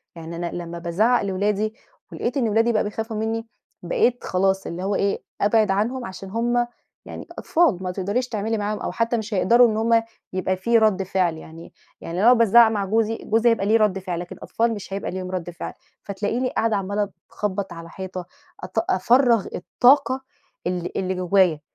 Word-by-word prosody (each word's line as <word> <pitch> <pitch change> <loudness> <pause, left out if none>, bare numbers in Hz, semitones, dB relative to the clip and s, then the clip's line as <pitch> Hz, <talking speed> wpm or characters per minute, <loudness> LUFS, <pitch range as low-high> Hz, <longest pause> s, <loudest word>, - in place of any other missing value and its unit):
يعني 165 0 -8
أنا 170 0 -3
لما 170 -1 -6
بازعّق 210 +9 +2
لولادي 205 +2 0 0.4
ولقيت 245 +3 -3
إن 235 -5 +1
ولادي 225 +3 +3
بقوا 215 - +2
بيخافوا 220 +1 -4
منّي، 225 +1 -2 0.4
بقيت 245 +8 +1
خلاص 190 +1 0
اللي 175 +2 -5
هو 200 +1 0
إيه، 200 0 0 0.2
أبعِد 215 0 +3
عنهم 235 +6 -1
عشان 190 -1 -8
هُم 240 +3 0 0.4
يعني - - -8
أطفال، 310 - +2
ما 185 - -2
تقدريش 205 +7 -2
تعملي 220 +1 -1
معاهم، 210 0 -2
أو - - -3
حتى 230 +1 0
مش 220 0 -5
هيقدَروا 235 +5 +5
إن 215 -1 -1
هُم 230 +1 +3 0.3
يبقى 185 0 0
في 230 +6 +2
رَد 215 -4 +3
فعل 185 -3 0
يعني، 160 +1 -12 0.3
يعني 170 - -5
لو - - +3
أنا 245 - +8
بازعّق 230 -1 +6
مع 205 -3 -1
جوزي، 225 +2 +1
جوزي 225 +2 +2
بيبقى 225 -4 +1
ليه 220 +2 +4
رَد 210 -3 +2
فعل، 180 -3 -4
لكن 175 0 -7
الأطفال 230 0 -1
مش 200 -2 -7
هيبقى 200 - -3
ليهم 185 0 -5
رد 180 -2 -4
فعل، 175 - -7 0.3
فتلاقيني 210 +6 -2
قاعدة 225 -2 0
عمّالة 200 +1 -1
ت 200 - -15 0.2
أخبّط 200 -1 -3
على 165 0 -9
حيطة 185 0 -6 0.4
أط 185 +5 -1
أفرّغ 235 +3 +3
الطاقة 260 +6 +3 0.5
اللي 180 -1 -2
اللي 185 0 -1
جوايا، 180 -3 +3
205 Hz, 190 wpm, -23 LUFS, 185-230 Hz, 0.5 s, أنا